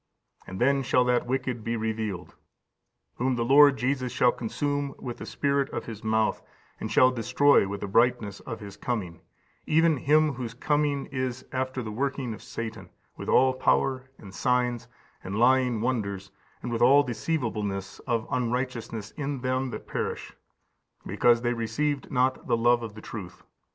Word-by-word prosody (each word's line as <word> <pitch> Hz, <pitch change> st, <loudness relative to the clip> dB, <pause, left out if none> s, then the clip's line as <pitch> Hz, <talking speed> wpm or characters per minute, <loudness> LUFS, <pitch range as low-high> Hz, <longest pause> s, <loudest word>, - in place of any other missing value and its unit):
And 95 Hz, -, -7 dB
then 140 Hz, +2 st, +3 dB
shall 125 Hz, -1 st, +2 dB
that 125 Hz, -1 st, +1 dB
wicked 125 Hz, -2 st, -2 dB
be 115 Hz, +1 st, -2 dB
revealed, 110 Hz, -5 st, -3 dB, 0.8 s
whom 130 Hz, +1 st, +1 dB
the 120 Hz, -1 st, -1 dB
Lord 140 Hz, +1 st, +7 dB
Jesus 130 Hz, -1 st, -1 dB
shall 125 Hz, -, +3 dB
consume 145 Hz, +4 st, -3 dB
with 120 Hz, -2 st, -6 dB
the -, -, -8 dB
Spirit 140 Hz, -1 st, 0 dB
of -, -, -5 dB
His 110 Hz, -2 st, -8 dB
mouth, 110 Hz, 0 st, +1 dB, 0.4 s
and -, -, -5 dB
shall 130 Hz, 0 st, +5 dB
destroy 125 Hz, 0 st, +3 dB
with 100 Hz, 0 st, -5 dB
the 100 Hz, -, -3 dB
brightness 115 Hz, -1 st, +2 dB
of 115 Hz, -, -7 dB
His 100 Hz, -1 st, -9 dB
coming: 100 Hz, -8 st, -4 dB, 0.5 s
(even 160 Hz, 0 st, +4 dB
him) 150 Hz, +2 st, +3 dB
whose 120 Hz, -2 st, -6 dB
coming 145 Hz, +1 st, 0 dB
is 130 Hz, -1 st, -3 dB
after 130 Hz, 0 st, -2 dB
the 110 Hz, -, -5 dB
working 135 Hz, 0 st, -2 dB
of -, -, -10 dB
Satan, 110 Hz, -5 st, -7 dB, 0.3 s
with -, -, -7 dB
all 130 Hz, +1 st, +5 dB
power, 130 Hz, 0 st, +1 dB
and 95 Hz, -3 st, -12 dB
signs, 125 Hz, -2 st, 0 dB, 0.4 s
and 95 Hz, +2 st, -4 dB
lying 125 Hz, -1 st, +3 dB
wonders, 100 Hz, -6 st, -2 dB, 0.3 s
and 120 Hz, -, -4 dB
with 115 Hz, -, -2 dB
all 140 Hz, +4 st, +6 dB
deceivableness 110 Hz, -8 st, -3 dB
of 115 Hz, -2 st, 0 dB
unrighteousness 120 Hz, -3 st, -2 dB
in 140 Hz, -3 st, -4 dB
them 130 Hz, +1 st, -1 dB
that -, -, -7 dB
perish; -, -, -4 dB, 0.7 s
because 120 Hz, -1 st, +3 dB
they 120 Hz, 0 st, +1 dB
received 130 Hz, +6 st, -2 dB
not 130 Hz, -1 st, +1 dB
the -, -, +2 dB
love 120 Hz, +1 st, +3 dB
of 110 Hz, -3 st, -7 dB
the 110 Hz, -, -9 dB
truth. 95 Hz, -6 st, -9 dB
125 Hz, 165 wpm, -27 LUFS, 110-130 Hz, 0.8 s, Lord